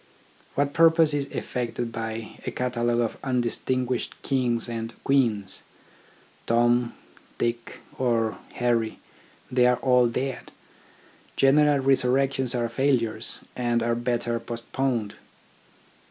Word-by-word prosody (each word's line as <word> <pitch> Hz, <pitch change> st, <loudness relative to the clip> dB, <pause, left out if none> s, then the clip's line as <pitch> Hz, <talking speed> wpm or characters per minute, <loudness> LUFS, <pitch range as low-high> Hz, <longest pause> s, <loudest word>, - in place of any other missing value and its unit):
What 140 Hz, 0 st, +1 dB
purpose 165 Hz, -2 st, +5 dB
is 140 Hz, -1 st, -1 dB
effected 120 Hz, -2 st, -3 dB
by 115 Hz, -1 st, -5 dB
a -, -, -2 dB
catalogue 120 Hz, -1 st, 0 dB
of 115 Hz, -, -2 dB
undistinguished 125 Hz, 0 st, -1 dB
kings 125 Hz, -4 st, 0 dB
and 115 Hz, -1 st, -5 dB
queens? 115 Hz, -8 st, +1 dB, 0.9 s
Tom, 120 Hz, +1 st, +2 dB, 0.4 s
Dick, 120 Hz, 0 st, -3 dB, 0.2 s
or 115 Hz, -3 st, +1 dB
Harry, 115 Hz, -2 st, 0 dB, 0.5 s
they 125 Hz, -1 st, +4 dB
are 125 Hz, 0 st, +3 dB
all 125 Hz, -2 st, +4 dB
dead. 130 Hz, +2 st, -3 dB, 0.8 s
General 145 Hz, +2 st, +5 dB
resurrections 135 Hz, -1 st, +2 dB
are 120 Hz, -1 st, 0 dB
failures, 115 Hz, -3 st, 0 dB
and 120 Hz, -2 st, 0 dB
are 120 Hz, 0 st, +1 dB
better 120 Hz, 0 st, -1 dB
post 115 Hz, 0 st, -6 dB
poned. 120 Hz, -6 st, 0 dB
120 Hz, 110 wpm, -25 LUFS, 115-130 Hz, 0.9 s, purpose